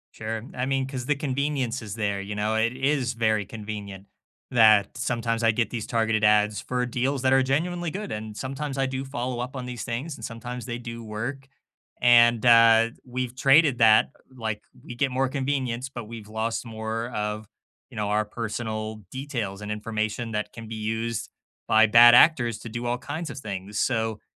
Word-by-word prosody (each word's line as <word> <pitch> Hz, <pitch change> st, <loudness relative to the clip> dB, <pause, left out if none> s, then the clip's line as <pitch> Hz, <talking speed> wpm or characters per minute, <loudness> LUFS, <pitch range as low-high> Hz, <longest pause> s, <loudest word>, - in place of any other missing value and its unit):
Sure, 110 Hz, 0 st, -4 dB
I 125 Hz, -, -2 dB
mean, 135 Hz, 0 st, 0 dB
'cause 130 Hz, -2 st, -5 dB
the 150 Hz, -, +2 dB
convenience 140 Hz, -3 st, -2 dB
is 105 Hz, -1 st, -6 dB
there, 100 Hz, -3 st, -1 dB
you 105 Hz, +1 st, -6 dB
know, 105 Hz, +1 st, 0 dB
it 115 Hz, +2 st, +2 dB
is 135 Hz, -1 st, 0 dB
very 110 Hz, -3 st, +1 dB
convenient 105 Hz, -2 st, -8 dB, 0.4 s
that 110 Hz, -4 st, +5 dB
sometimes 115 Hz, -1 st, -1 dB
I 115 Hz, -, +5 dB
get 115 Hz, +1 st, -1 dB
these 115 Hz, -3 st, -4 dB
targeted 110 Hz, -2 st, 0 dB
ads 105 Hz, -1 st, +3 dB
for 125 Hz, -1 st, -2 dB
deals 130 Hz, +3 st, -1 dB
that 130 Hz, 0 st, +4 dB
are 135 Hz, 0 st, +5 dB
genuinely 170 Hz, +5 st, -1 dB
good, 205 Hz, +4 st, -5 dB
and 110 Hz, 0 st, -6 dB
sometimes 135 Hz, +1 st, -4 dB
I 135 Hz, -, +2 dB
do 130 Hz, 0 st, -3 dB
follow 125 Hz, -2 st, -4 dB
up 130 Hz, +2 st, -5 dB
on 125 Hz, -, -5 dB
these 125 Hz, -1 st, -6 dB
things, 130 Hz, +7 st, -4 dB
and -, -, -13 dB
sometimes 120 Hz, +1 st, -6 dB
they 120 Hz, -2 st, -4 dB
do 115 Hz, -1 st, -7 dB
work, 120 Hz, +6 st, -5 dB, 0.5 s
and, 120 Hz, -1 st, +5 dB
uh, 115 Hz, -1 st, +6 dB
we've 125 Hz, 0 st, -4 dB
traded 135 Hz, +1 st, +5 dB
that, 110 Hz, -2 st, +5 dB, 0.2 s
like, 110 Hz, -4 st, -4 dB, 0.2 s
we 120 Hz, -, -9 dB
get 135 Hz, +2 st, 0 dB
more 130 Hz, +1 st, +1 dB
convenience, 130 Hz, -2 st, -2 dB
but 120 Hz, -4 st, -7 dB
we've 110 Hz, -1 st, -10 dB
lost 110 Hz, +2 st, -2 dB
more 115 Hz, +1 st, -4 dB
of, 105 Hz, -1 st, -4 dB, 0.4 s
you -, -, -12 dB
know, 105 Hz, -1 st, -1 dB
our 105 Hz, +1 st, +2 dB
personal 110 Hz, -1 st, -5 dB
details 120 Hz, -8 st, -4 dB
and 105 Hz, -, -6 dB
information 110 Hz, +2 st, -3 dB
that 105 Hz, 0 st, -3 dB
can 115 Hz, -1 st, -9 dB
be 115 Hz, -, -5 dB
used 110 Hz, +1 st, -3 dB, 0.4 s
by 110 Hz, 0 st, +5 dB
bad 120 Hz, +2 st, +8 dB
actors 120 Hz, -9 st, +5 dB
to 115 Hz, -, -8 dB
do 120 Hz, +2 st, -5 dB
all 120 Hz, +1 st, 0 dB
kinds 145 Hz, +5 st, -5 dB
of 135 Hz, -, -8 dB
things. 100 Hz, -3 st, -5 dB
So, 110 Hz, -3 st, -1 dB
115 Hz, 190 wpm, -25 LUFS, 110-130 Hz, 0.5 s, bad